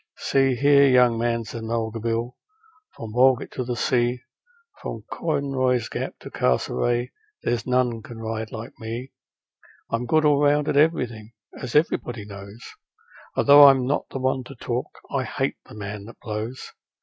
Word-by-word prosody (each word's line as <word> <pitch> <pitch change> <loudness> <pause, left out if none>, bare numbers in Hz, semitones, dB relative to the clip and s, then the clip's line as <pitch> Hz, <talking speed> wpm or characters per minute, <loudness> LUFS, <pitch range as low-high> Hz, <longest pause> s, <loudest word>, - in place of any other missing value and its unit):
'See, 135 -1 +2
here, 140 +2 +5
young 125 -2 +5
man,' 115 0 0
said 115 +1 -7
Mulga 115 0 -2
Bill, 115 +2 -2 0.6
'from 110 -2 -8
Walgett 130 +1 +3
to 130 - -3
the 120 0 -3
sea, 120 +1 0 0.6
From - - -6
Conroy's 130 -6 0
Gap - - -4
to - - -9
Castlereagh, 120 - 0 0.3
there's 120 -1 -1
none 125 -2 +1
can 115 +2 -10
ride 110 0 -4
like 115 +3 -7
me. 115 +4 -6 0.8
I'm 115 +1 -1
good 155 +2 +3
all 145 -1 +4
round 145 0 +3
at - - 0
everything, 120 -8 +1 0.2
as 125 +1 -7
everybody 120 -8 +1
knows, 100 +2 -11 0.7
Although 145 0 +8
I'm 135 -2 +5
not 140 +3 -1
the - - -5
one 130 0 0
to 135 - -10
talk 125 +1 -3 0.2
I - - 0
HATE - - -2
a - - -12
man 100 -1 -6
that 115 - -13
blows. 110 +3 -5
120 Hz, 160 wpm, -24 LUFS, 115-135 Hz, 0.8 s, Although